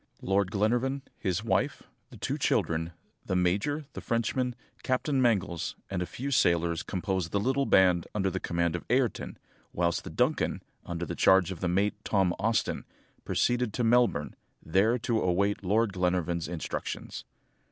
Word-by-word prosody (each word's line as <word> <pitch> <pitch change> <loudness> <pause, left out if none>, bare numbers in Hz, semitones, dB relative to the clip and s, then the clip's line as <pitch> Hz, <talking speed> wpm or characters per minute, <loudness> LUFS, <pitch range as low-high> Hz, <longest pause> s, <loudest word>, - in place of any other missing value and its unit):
Lord 95 0 +2
Glenarvan, 120 +7 0 0.2
his 95 0 -1
wife, 115 - 0 0.3
the - - -12
two - - -3
children, 80 0 +1 0.3
the 95 - -2
major, 100 - +1
the - - -6
Frenchman, 120 +2 -1 0.3
Captain 130 +1 0
Mangles, 100 -8 0 0.2
and 95 -2 -1
a 90 - -2
few 140 +3 -5
sailors 85 - +2
composed 95 -2 -2
the 100 - +1
little 135 +5 +1
band 90 -2 +4
under 95 -2 +1
the - - -2
command 85 0 0
of 85 - -4
Ayrton, 125 -1 0 0.4
whilst 85 -1 0
the - - -7
Duncan, - - 0 0.2
under 85 0 -3
charge 95 0 +4
of 90 - -6
the 90 - -1
mate, 100 +4 0
Tom 95 -4 +2
Austin, 110 +2 0 0.4
proceeded 120 -3 +1
to 125 - -1
Melbourne, 115 -10 +2 0.3
there 95 +9 +3
to 115 -1 0
await 100 +3 +1
Lord 105 +2 +2
Glenarvan's 90 -2 0
instructions. 85 -2 -5
95 Hz, 150 wpm, -29 LUFS, 90-115 Hz, 0.4 s, band